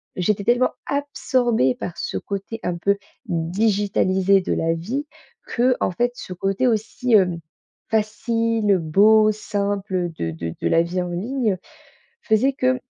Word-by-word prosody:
j'étais 200 Hz, +2 st, 0 dB
tellement 245 Hz, +3 st, +3 dB, 0.2 s
absorbée 250 Hz, -, +1 dB
par 175 Hz, -, -6 dB
ce -, -, -3 dB
côté 200 Hz, +3 st, -5 dB
un 180 Hz, -, -1 dB
peu 200 Hz, +4 st, +1 dB, 0.3 s
digitalisé 190 Hz, +2 st, +2 dB
de -, -, -4 dB
la 165 Hz, 0 st, +1 dB
vie, 235 Hz, -, -3 dB, 0.5 s
qu'en 245 Hz, -4 st, +2 dB
fait, 240 Hz, +7 st, 0 dB
ce 185 Hz, -, -7 dB
côté 195 Hz, +6 st, -1 dB
aussi, 225 Hz, +2 st, -1 dB
hem, 180 Hz, -5 st, +4 dB, 0.5 s
facile, 225 Hz, -1 st, +1 dB
beau, 215 Hz, +7 st, +5 dB
simple 200 Hz, -3 st, -2 dB
de 80 Hz, 0 st, -2 dB
de 80 Hz, 0 st, -5 dB
de -, -, +1 dB
la 165 Hz, -, +4 dB
vie 180 Hz, +2 st, -2 dB
en 180 Hz, -, -3 dB
ligne, 215 Hz, +3 st, -1 dB, 0.6 s
faisait 235 Hz, +5 st, +2 dB
que 255 Hz, -1 st, +1 dB
205 Hz, 140 wpm, -22 LUFS, 180-230 Hz, 0.6 s, beau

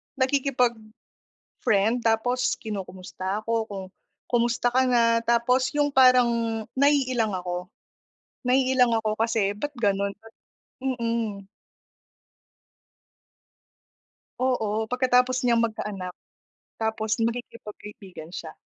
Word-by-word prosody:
nakikipag-friend 250 Hz, -5 st, -1 dB, 1.0 s
tapos 240 Hz, +3 st, +1 dB
kinukumusta 190 Hz, -1 st, -5 dB
ako 225 Hz, -1 st, -1 dB
kung, 195 Hz, -3 st, -6 dB, 0.5 s
"kumusta 240 Hz, 0 st, +1 dB
ka 260 Hz, +1 st, +3 dB
na?" 230 Hz, -2 st, +3 dB
Tapos 250 Hz, +2 st, +3 dB
yung 290 Hz, -1 st, +2 dB
parang 235 Hz, -4 st, +4 dB, 0.2 s
naiilang 255 Hz, -7 st, +2 dB
ako 180 Hz, 0 st, -4 dB, 0.8 s
naiilang 255 Hz, -1 st, +3 dB
ako 215 Hz, -1 st, -1 dB
kasi 220 Hz, -3 st, +1 dB
ba't 290 Hz, +5 st, -4 dB
ganon? 200 Hz, -4 st, 0 dB, 0.7 s
Mm. 230 Hz, -6 st, -2 dB, 2.9 s
Oo, 220 Hz, -4 st, 0 dB
pagkatapos 250 Hz, 0 st, +2 dB
niyang 235 Hz, -1 st, +3 dB
magkaanak 210 Hz, -5 st, -3 dB, 0.7 s
tapos 220 Hz, -1 st, -1 dB
makikipagkaibigan 210 Hz, -6 st, -6 dB
siya. 160 Hz, -3 st, -7 dB
230 Hz, 85 wpm, -25 LUFS, 210-250 Hz, 2.9 s, parang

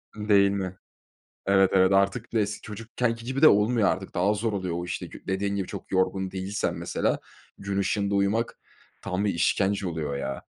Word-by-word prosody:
Iıı, 105 Hz, 0 st, -6 dB
değil 100 Hz, -1 st, +6 dB
mi? 95 Hz, -2 st, -3 dB, 0.7 s
Evet, 95 Hz, -1 st, +4 dB
evet, 95 Hz, 0 st, +5 dB
artık 100 Hz, +4 st, +1 dB
bir 115 Hz, -, +1 dB
de -, -, +4 dB
es 105 Hz, +1 st, -3 dB
çocukkenki 115 Hz, +2 st, -3 dB
gibi 130 Hz, +3 st, -3 dB
de 155 Hz, -, +10 dB
olmuyor 105 Hz, 0 st, +3 dB
artık. 95 Hz, 0 st, -3 dB
Daha 95 Hz, +3 st, +2 dB
zor 110 Hz, +1 st, -1 dB
oluyor 95 Hz, -4 st, -2 dB
o, 85 Hz, -, -4 dB
işte, 90 Hz, +1 st, -5 dB
kü -, -, -13 dB
dediğin 100 Hz, +1 st, -1 dB
gibi 95 Hz, -, -2 dB
çok -, -, -8 dB
yorgun 95 Hz, 0 st, +1 dB
değilsen, 95 Hz, +2 st, -2 dB
mesela, -, -, -1 dB, 0.4 s
gün 100 Hz, 0 st, -3 dB
ışığında 100 Hz, +1 st, 0 dB
uyumak 100 Hz, +4 st, 0 dB, 0.4 s
tam 90 Hz, +3 st, -2 dB
bir 100 Hz, -, +1 dB
işkence 95 Hz, +4 st, +1 dB
oluyor, 75 Hz, -4 st, -3 dB
ya. 70 Hz, -1 st, -4 dB
100 Hz, 195 wpm, -26 LUFS, 95-105 Hz, 0.7 s, de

